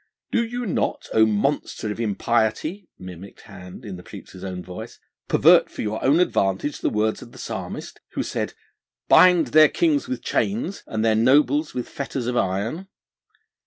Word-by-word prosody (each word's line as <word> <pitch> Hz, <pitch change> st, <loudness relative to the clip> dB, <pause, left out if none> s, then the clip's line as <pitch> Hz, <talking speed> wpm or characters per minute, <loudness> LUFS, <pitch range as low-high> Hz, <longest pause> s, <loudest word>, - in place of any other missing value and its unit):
'Did 235 Hz, -1 st, 0 dB
you 245 Hz, 0 st, -3 dB
not, 190 Hz, -, -2 dB
O 110 Hz, 0 st, +5 dB
monster 110 Hz, 0 st, -1 dB
of 105 Hz, -, -6 dB
impiety,' 115 Hz, -, -1 dB
mimicked 90 Hz, +1 st, -11 dB
Hind 90 Hz, +6 st, -12 dB
in 95 Hz, -3 st, -6 dB
the -, -, -10 dB
preacher's 90 Hz, +1 st, -12 dB
own 90 Hz, -2 st, -5 dB
voice, 90 Hz, +1 st, -9 dB, 0.3 s
'pervert -, -, +5 dB
for -, -, -6 dB
your 110 Hz, 0 st, -3 dB
own 145 Hz, +5 st, +4 dB
advantage 100 Hz, -, 0 dB
the -, -, 0 dB
words 110 Hz, +1 st, 0 dB
of 120 Hz, -, -12 dB
the -, -, -13 dB
Psalmist, -, -, -6 dB
who -, -, -1 dB
said, -, -, -3 dB, 0.5 s
"Bind 180 Hz, -3 st, +6 dB
their 155 Hz, -1 st, +7 dB
kings 310 Hz, -5 st, +1 dB
with 260 Hz, -, -4 dB
chains, 200 Hz, -1 st, -1 dB
and 110 Hz, 0 st, -2 dB
their 110 Hz, -, +4 dB
nobles 145 Hz, +6 st, +3 dB
with 125 Hz, -, -3 dB
fetters 135 Hz, -3 st, -5 dB
of 125 Hz, 0 st, -2 dB
iron"? 110 Hz, -, -1 dB
120 Hz, 165 wpm, -23 LUFS, 105-160 Hz, 0.5 s, their